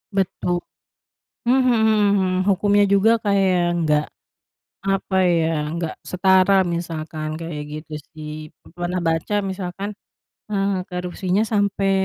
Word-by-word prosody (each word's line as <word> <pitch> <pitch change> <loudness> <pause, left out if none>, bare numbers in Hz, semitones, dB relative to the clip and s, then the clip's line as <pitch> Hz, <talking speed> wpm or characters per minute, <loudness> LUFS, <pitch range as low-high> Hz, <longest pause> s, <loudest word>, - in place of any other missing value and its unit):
Betul, 180 -2 0 0.9
mhm 255 0 +4 0.4
mhm. 190 -2 +2 0.2
Hukumnya 205 +1 +3
juga 200 +3 +5
kayak 195 -3 +2 0.2
enggak, 150 -3 +2 0.9
apa 195 0 0 0.2
ya, 165 -1 +2 0.3
enggak 165 -1 -3 0.2
setara 190 +1 +4 0.2
misalkan, 160 -2 -4
kayak 165 -3 -5
gitu 155 +1 -8 0.2
sih. 155 -1 -8 0.5
Pernah 175 +1 -2
baca 165 +5 -1 0.2
misalkan, 190 +1 -5 0.6
eee, 200 -1 +1 0.2
korupsinya 180 +2 -1
sampai, 200 -1 +1
185 Hz, 105 wpm, -22 LUFS, 165-200 Hz, 0.9 s, juga